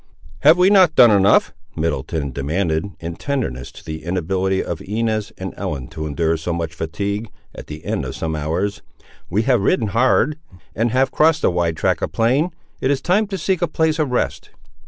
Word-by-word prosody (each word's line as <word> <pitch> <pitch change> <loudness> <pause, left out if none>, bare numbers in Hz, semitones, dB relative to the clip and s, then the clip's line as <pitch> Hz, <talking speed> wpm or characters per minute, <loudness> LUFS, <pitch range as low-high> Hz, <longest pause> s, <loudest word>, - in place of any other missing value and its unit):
"Have 155 - +6
we 180 +2 +5
not 185 -6 +5
done 120 -3 +8
enough," 100 -1 +4 0.2
Middleton 80 -2 -2
demanded, 80 +5 -1
in 85 0 -6
tenderness 115 - -3
to - - -14
the 80 -1 -6
inability 95 +2 -1
of 85 - -5
Inez 110 +1 -2
and - - -5
Ellen 70 -5 -4
to 80 0 -5
endure 80 +2 0
so 80 +3 -4
much 85 -2 -3
fatigue, 100 +7 -3 0.2
at - - -10
the 75 0 -9
end - - -1
of - - -6
some 80 -1 -3
hours; 85 +7 -2 0.5
"we 105 +6 +1
have 125 -4 +2
ridden 105 +2 +1
hard, 130 +6 +2 0.4
and 115 +3 +1
have 130 +3 +2
crossed 160 0 +3
a - - +4
wide 85 -2 0
tract - - +1
of - - -2
plain. 130 +9 +2 0.3
It 130 - 0
is 140 -1 +2
time 185 +9 +1
to 195 -1 -4
seek 185 +1 -1
a 175 - +2
place 160 0 0
of 150 -3 +1
rest." 125 - -2
100 Hz, 195 wpm, -20 LUFS, 80-135 Hz, 0.5 s, done